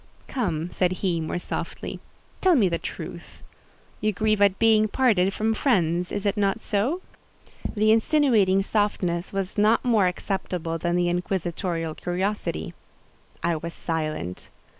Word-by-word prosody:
"Come," 175 - -2
said 185 -1 +1
he, 170 -3 +1
more 160 +2 -2
softly, 175 - -5 0.4
"tell 370 -2 +5
me 220 -9 +4
the 170 -1 -1
truth—you 215 - -7
grieve 215 +1 +1
at 200 -1 +4
being 220 -1 +4
parted 205 -6 +3
from 220 +2 0
friends—is 180 - +1
it 200 +1 +2
not 200 0 +1
so?" 235 - -1 0.7
The 215 +1 +4
insinuating 225 -6 +3
softness 195 -4 0
was 195 +1 -3
not 215 +4 +3
more 220 -6 +4
acceptable 180 -2 -3
than 175 +1 0
the 175 0 +2
inquisitorial 175 -2 -2
curiosity. 190 +6 -2 0.7
I 170 - +1
was 170 +2 -6
silent. 155 - -3
195 Hz, 130 wpm, -25 LUFS, 175-215 Hz, 0.7 s, tell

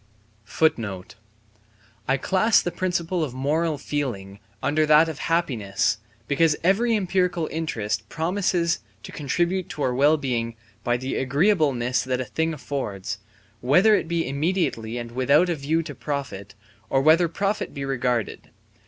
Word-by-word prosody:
* 110 +8 -2 1.3
I 135 - +2
class 195 - +3
the 175 - -2
principle 175 -1 -1
of 130 -5 -4
moral 150 +4 0
feeling 105 -10 -4 0.2
under 155 +2 +2
that 155 +2 +6
of 155 -2 -6
happiness, 115 - 0 0.3
because 150 +2 +3
every 225 +6 +3
empirical 180 -4 0
interest 110 -10 -3
promises 170 0 0 0.2
to - - -9
contribute 175 +5 -1
to 150 - -4
our 125 - +1
well 145 +5 +4
being 120 -5 -2 0.3
by 120 0 +1
the 130 +2 -3
agreeableness 140 - +2
that 130 0 -1
a 130 - -2
thing 160 +5 -1
affords, 130 -11 -4 0.4
whether 180 - +4
it 205 - +1
be 165 -2 -1
immediately 140 -6 -1
and 120 -1 -6
without 140 +8 +3
a 170 - +1
view 155 +3 0
to - - -7
profit, 125 -10 -5 0.3
or 135 - +2
whether 165 +3 +5
profit 200 +5 -2
be 140 -2 -5
regarded. 125 -4 -2
145 Hz, 145 wpm, -24 LUFS, 125-170 Hz, 1.3 s, that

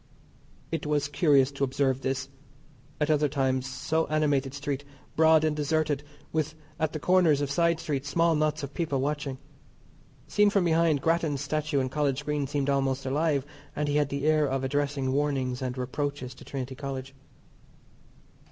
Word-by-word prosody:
It 165 -2 -2
was 145 -1 +1
curious 140 -2 +3
to 140 0 -3
observe 135 0 +1
this, 130 0 -2 0.7
at 150 0 +2
other 150 -1 +3
times, 130 -2 0
so 160 +4 -1
animated 145 -3 +1
street, 140 -1 -3 0.3
broad 160 0 +5
and 155 -1 +1
deserted, 150 -1 0 0.3
with 155 0 -1 0.2
at 160 -1 0
the 155 - -3
corners 175 -4 +4
of 145 -1 -2
side 170 +2 +2
streets 145 -2 -3
small 165 +3 +3
knots 155 -1 0
of 140 0 -6
people 150 -5 -1
watching. 140 -1 -2 0.9
Seen 210 0 +4
from 200 -2 +2
behind, 160 -3 +2
Grattan's 165 -4 +1
Statue 150 0 -1
in 130 -1 0
College 140 -1 -1
Green 150 -2 -1
seemed 140 0 -1
almost 135 -1 0
alive, 140 0 +1 0.3
and 150 0 -1
he 145 0 +1
had 145 -2 +2
the 140 +1 -3
air 155 -1 +3
of 135 0 -1
addressing 140 -1 0
warnings 135 -3 0
and 130 0 -3
reproaches 130 0 -3
to - - -14
Trinity 130 -1 -5
College. 135 -1 -6
145 Hz, 165 wpm, -28 LUFS, 135-155 Hz, 0.9 s, broad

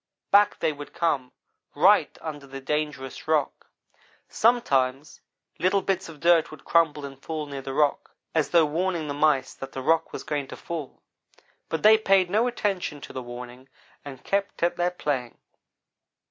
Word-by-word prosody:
back 205 +1 +5
they 155 - 0
would 145 0 -10
come 140 -7 0 0.4
right - - +4
under 145 -3 -7
the 135 0 -8
dangerous 150 -1 -3
rock. 155 -3 0 0.6
Sometimes 140 - +1 0.4
little 190 +2 +2
bits 190 -2 -1
of 155 -3 -12
dirt 170 -1 +4
would 155 - -13
crumble 155 -4 +2
and 135 -1 -10
fall 155 0 -4
near 140 -2 -6
the 135 - -6
rock. 145 +1 0 0.2
as 160 -2 +1
though 170 -2 +5
warning 165 +1 -1
the 145 - -3
mice 145 -3 +2
that 135 - -9
the 130 - -4
rock 165 +3 +2
was - - -6
going 145 -2 -3
to - - -9
fall, 160 -5 -7 0.7
but 160 - -3
they 215 +1 +7
paid 195 -4 +3
no 220 +4 +3
attention 195 -10 -2
to - - -10
the 130 - -4
warning, 125 +2 -10 0.3
and 135 -3 -10
kept 200 -3 -2
at 170 - +2
their 175 0 +1
playing. 140 -9 -3
150 Hz, 170 wpm, -26 LUFS, 135-175 Hz, 0.7 s, they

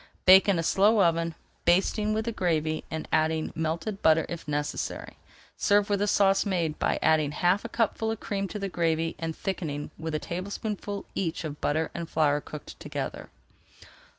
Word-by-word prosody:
Bake 190 +2 +8
in 195 - +3
a 165 - 0
slow 205 +6 +4
oven, 165 -1 +1 0.3
basting 195 +4 +2
with 220 +1 -1
the 230 - -1
gravy, 160 -6 0
and 160 0 -5
adding 155 0 +1
melted 165 +5 -3
butter 160 0 +4
if 170 -3 -6
necessary. 145 0 -3 0.4
Serve 205 0 +3
with 200 -1 +1
a 205 - +2
sauce 195 -1 +4
made 170 -6 -1
by - - +1
adding 155 -2 +3
half 180 +6 +2
a - - -5
cupful 225 -1 0
of 220 -1 -3
cream 200 -1 -2
to 210 - -6
the 200 -1 -3
gravy 165 -2 0
and 165 -1 -3
thickening 155 -6 -4
with 160 -1 -3
a - - +2
tablespoonful 200 +4 -4
each 170 -3 -2
of 150 -2 -6
butter 155 +2 0
and 170 -1 -5
flour 145 -2 +2
cooked 150 0 -10
together. - - -5
170 Hz, 180 wpm, -27 LUFS, 160-200 Hz, 0.4 s, Bake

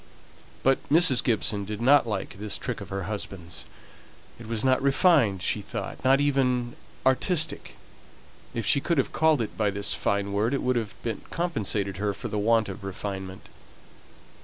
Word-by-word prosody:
But 135 0 +3
Mrs. 155 -5 +5
Gibson 105 -3 +1
did 105 +1 -5
not 135 +2 +5
like 95 -2 -4
this 105 0 -1
trick 125 -5 -5
of 100 - -8
her 100 -1 -3
husband's; 95 -4 -4 0.7
it 115 - -10
was 115 -1 -3
not 130 0 +3
refined 140 - +3
she - - 0
thought, - - -6
not 135 +1 +4
even 125 -4 +1 0.3
"artistic;" 155 +5 0 0.8
if 115 -2 -2
she 140 - +3
could 170 +2 0
have 135 - 0
called 155 -5 +3
it 110 - -7
by 105 -2 +1
this 100 0 0
fine 100 0 -1
word 110 +6 +1
it - - -3
would 125 0 +1
have 110 -4 -3 0.3
compensated 105 - -2
her 100 0 -1
for - - -6
the 105 - -2
want 115 +1 +3
of 95 0 -8
refinement. 95 -1 -6
115 Hz, 165 wpm, -26 LUFS, 100-135 Hz, 0.8 s, Mrs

